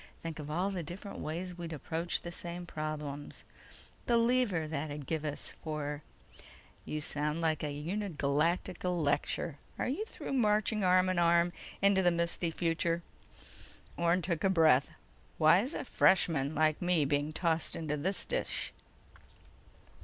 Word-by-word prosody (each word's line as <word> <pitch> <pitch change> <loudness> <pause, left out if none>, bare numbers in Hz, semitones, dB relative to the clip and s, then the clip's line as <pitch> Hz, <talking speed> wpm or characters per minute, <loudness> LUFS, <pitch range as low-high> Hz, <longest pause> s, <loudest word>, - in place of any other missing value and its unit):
Think 165 -2 -6
of 150 -1 -6
all 180 +6 0
the 185 -3 -2
different 180 +5 -7
ways 175 +3 -4
we'd 170 -1 -5
approach 165 +3 -2
the 175 - -6
same 175 0 -6
problems... 150 -3 -5 0.6
the 235 - +4
lever 230 -9 +2
that'd 150 -2 -4
give 160 0 -2
us 150 -1 -4
for—" 150 -2 -3 0.8
"You 155 - -3
sound 150 +2 -1
like 160 -2 +1
a 150 - -1
Uni 180 +9 -3
Galacta 165 +4 0
lecture! 155 -2 0 0.2
Are - - -1
you 285 +12 -1
through 445 - -6
marching 215 -3 +2
arm 185 0 +5
in 185 -1 +1
arm 170 0 +4 0.3
into 200 -1 +5
the 180 - +5
misty 170 0 0
future?" 165 0 0 0.9
Orne 170 +1 +2
took 170 -2 -1
a - - +5
deep 190 - +1
breath. 155 -5 +5 0.5
"Why's 180 - +4
a - - -3
freshman 160 - +3
like 155 0 +2
me 175 -4 +3
being 145 +1 0
tossed 165 0 0
into 155 -2 -2
this 180 +7 -2
dish?" - - -3
170 Hz, 150 wpm, -32 LUFS, 155-185 Hz, 0.9 s, arm